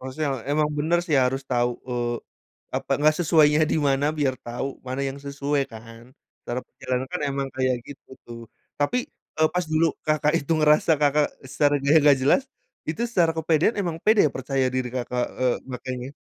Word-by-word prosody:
Maksudnya, 130 Hz, +3 st, -3 dB, 0.2 s
emang 150 Hz, +1 st, +2 dB
bener 165 Hz, +3 st, +2 dB
sih 155 Hz, -5 st, +1 dB
harus 135 Hz, +2 st, -1 dB
tau 120 Hz, 0 st, +2 dB, 0.2 s
eee, 120 Hz, -1 st, -1 dB, 0.6 s
apa, -, -, -6 dB
gak 155 Hz, 0 st, +5 dB
sesuainya 155 Hz, -3 st, +4 dB
di -, -, +1 dB
mana 135 Hz, +1 st, +1 dB
biar 135 Hz, -3 st, +1 dB
tau 120 Hz, +3 st, -3 dB, 0.2 s
mana 130 Hz, +2 st, -3 dB
yang 135 Hz, +1 st, -7 dB
sesuai 140 Hz, 0 st, -1 dB
kan, 115 Hz, +1 st, -11 dB, 0.4 s
secara 120 Hz, +1 st, -4 dB
pikiran 130 Hz, 0 st, -3 dB
kan 180 Hz, -, -3 dB
emang 140 Hz, 0 st, -2 dB
kayak 130 Hz, -1 st, +1 dB
gitu 145 Hz, -, -13 dB
tuh. 120 Hz, -1 st, -9 dB, 0.4 s
Tapi, 145 Hz, +12 st, +1 dB, 0.4 s
eee, 155 Hz, 0 st, +4 dB
pas 180 Hz, -1 st, +1 dB
dulu, 160 Hz, +1 st, +4 dB, 0.2 s
Kakak, 150 Hz, 0 st, +2 dB
itu 145 Hz, +3 st, -2 dB
ngerasa, 150 Hz, +1 st, +4 dB
Kakak, 145 Hz, 0 st, +3 dB, 0.2 s
sarannya 140 Hz, +1 st, +1 dB
gak 145 Hz, -1 st, +6 dB
jelas, 145 Hz, -, +4 dB, 0.5 s
itu 165 Hz, +9 st, -2 dB
secara 170 Hz, -7 st, +3 dB
kepedean 160 Hz, +6 st, +2 dB
emang 170 Hz, -4 st, -2 dB
pede 215 Hz, -1 st, +5 dB
percaya 130 Hz, 0 st, -1 dB
diri, 130 Hz, -1 st, -1 dB
Kakak, 125 Hz, 0 st, -1 dB
eee, 130 Hz, -1 st, +1 dB
makanya 125 Hz, 0 st, -5 dB
140 Hz, 170 wpm, -24 LUFS, 130-155 Hz, 0.6 s, gak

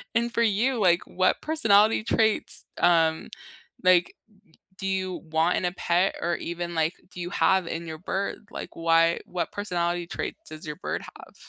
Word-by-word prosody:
And 235 Hz, +1 st, +1 dB
for 235 Hz, -, +1 dB
you, 230 Hz, +4 st, +1 dB
like 175 Hz, -4 st, +4 dB
what 185 Hz, +1 st, +1 dB
personality 220 Hz, -9 st, +3 dB
traits, 220 Hz, -1 st, +1 dB
um, 165 Hz, -2 st, +3 dB, 0.5 s
like, 180 Hz, -1 st, +4 dB, 0.6 s
do 195 Hz, -, -4 dB
you 190 Hz, -1 st, -2 dB
want 160 Hz, +2 st, +2 dB
in -, -, -1 dB
a 175 Hz, -, -1 dB
pet, 180 Hz, +1 st, +1 dB
or 170 Hz, 0 st, 0 dB
even, 170 Hz, 0 st, -5 dB
like, 160 Hz, +1 st, +1 dB, 0.2 s
do 180 Hz, -, -8 dB
you 175 Hz, -, -3 dB
have 190 Hz, -3 st, +2 dB
in 170 Hz, 0 st, -5 dB
your 160 Hz, -1 st, -6 dB
bird? 200 Hz, +4 st, -4 dB
Like -, -, -7 dB
why 165 Hz, 0 st, +3 dB
what 180 Hz, -1 st, -3 dB
personality 175 Hz, -3 st, -2 dB
traits -, -, -5 dB
does 155 Hz, +1 st, -9 dB
your 150 Hz, -, -5 dB
bird 180 Hz, -, -4 dB
have? -, -, -14 dB
175 Hz, 170 wpm, -26 LUFS, 170-200 Hz, 0.6 s, like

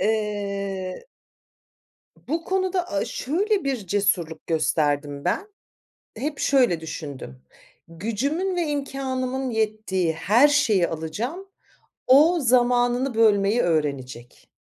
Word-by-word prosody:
Eee 200 Hz, -, -2 dB, 1.2 s
Bu 325 Hz, +5 st, -2 dB
konuda 375 Hz, 0 st, -1 dB
a 200 Hz, -1 st, 0 dB
şöyle 385 Hz, -, -1 dB
bir 255 Hz, -9 st, -3 dB
cesurluk 175 Hz, -5 st, 0 dB
gösterdim 145 Hz, -3 st, 0 dB
ben, 210 Hz, -, -1 dB, 0.7 s
hep 290 Hz, +4 st, -4 dB
şöyle 250 Hz, -, +3 dB
düşündüm: 145 Hz, -, -8 dB, 0.5 s
Gücümün 255 Hz, -, -2 dB
ve 345 Hz, -2 st, 0 dB
imkânımın 265 Hz, -2 st, -3 dB
yettiği 215 Hz, -6 st, -1 dB
her 210 Hz, -, +4 dB
şeyi 230 Hz, -12 st, +3 dB
alacağım, 220 Hz, -, -5 dB, 0.6 s
o 305 Hz, +7 st, +6 dB
zamanını 245 Hz, 0 st, +2 dB
bölmeyi 215 Hz, 0 st, +3 dB
öğrenecek. 140 Hz, -7 st, -3 dB
220 Hz, 95 wpm, -24 LUFS, 175-275 Hz, 1.2 s, o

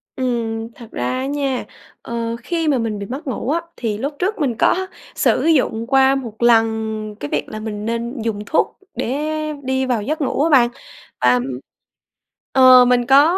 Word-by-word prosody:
Ừm, 230 Hz, -3 st, -2 dB
thật 235 Hz, -, -11 dB
ra 120 Hz, -, -2 dB
á 260 Hz, -, -2 dB
nha, 275 Hz, -2 st, -2 dB, 0.4 s
ờ, 230 Hz, 0 st, -3 dB
khi 330 Hz, -2 st, -1 dB
mà 285 Hz, -, +3 dB
mình 225 Hz, -3 st, -2 dB
bị 200 Hz, -, -5 dB
mất 270 Hz, +7 st, -7 dB
ngủ 260 Hz, 0 st, -3 dB
á 330 Hz, +2 st, +1 dB, 0.2 s
thì 215 Hz, -4 st, -2 dB
lúc 280 Hz, +6 st, -3 dB
trước 390 Hz, +4 st, 0 dB
mình 265 Hz, -7 st, 0 dB
có 375 Hz, 0 st, +2 dB, 0.3 s
sử -, -, +2 dB
dụng 250 Hz, -8 st, +2 dB
qua 270 Hz, 0 st, +4 dB
một 235 Hz, -4 st, -6 dB
lần 220 Hz, -2 st, +2 dB
cái 145 Hz, -, -5 dB
việc -, -, -2 dB
là 215 Hz, -, -6 dB
mình 215 Hz, -1 st, -5 dB
nên 235 Hz, +2 st, -3 dB
dùng 220 Hz, -2 st, -2 dB
thuốc 315 Hz, -, 0 dB, 0.2 s
để 290 Hz, +6 st, -2 dB, 0.3 s
đi 265 Hz, 0 st, 0 dB
vào 245 Hz, -4 st, 0 dB
giấc 305 Hz, +9 st, -3 dB
ngủ 280 Hz, +1 st, 0 dB
á 330 Hz, -, +2 dB
bạn. 250 Hz, -5 st, +5 dB, 0.5 s
Và, 125 Hz, 0 st, +5 dB
ừm, 125 Hz, 0 st, +1 dB, 1.1 s
ờ, 255 Hz, -1 st, +8 dB
mình 245 Hz, -1 st, +3 dB
có 290 Hz, +7 st, +5 dB
245 Hz, 190 wpm, -19 LUFS, 225-275 Hz, 1.1 s, ờ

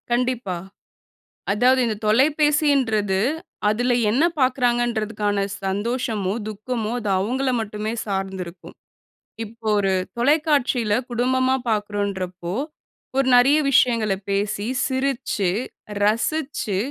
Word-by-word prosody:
கண்டிப்பா. 240 Hz, -6 st, 0 dB, 1.0 s
அதாவது 250 Hz, +5 st, +4 dB
இந்த 220 Hz, -2 st, -1 dB
தொலைபேசின்றது, 270 Hz, -5 st, +2 dB, 0.5 s
அதில 245 Hz, +4 st, +1 dB, 0.2 s
என்ன 260 Hz, +9 st, +2 dB, 0.2 s
பாக்குறாங்கன்றதுக்கான 235 Hz, -5 st, +1 dB, 0.2 s
சந்தோஷமோ, 205 Hz, 0 st, -1 dB, 0.2 s
துக்கமோ 215 Hz, +1 st, -3 dB
அது 215 Hz, -, -4 dB
அவுங்கள 255 Hz, +7 st, 0 dB
மட்டுமே 215 Hz, 0 st, -4 dB
சார்ந்திருக்கும். 190 Hz, -3 st, -5 dB, 0.7 s
இப்போ 225 Hz, +1 st, -10 dB
ஒரு 195 Hz, -1 st, +1 dB, 0.2 s
தொலைக்காட்சியில 275 Hz, -4 st, +2 dB, 0.2 s
குடும்பமா 260 Hz, +2 st, +2 dB
பாக்கறோன்றப்போ, 200 Hz, -4 st, -2 dB, 0.6 s
ஒரு 270 Hz, -1 st, +2 dB
நெறைய 270 Hz, +5 st, +6 dB
விஷயங்கள 230 Hz, -5 st, +3 dB, 0.2 s
பேசி, 200 Hz, +1 st, -1 dB, 0.2 s
சிரிச்சு, 260 Hz, -7 st, -1 dB, 0.5 s
ரசிச்சு, 230 Hz, 0 st, 0 dB
225 Hz, 85 wpm, -22 LUFS, 205-255 Hz, 1.0 s, நெறைய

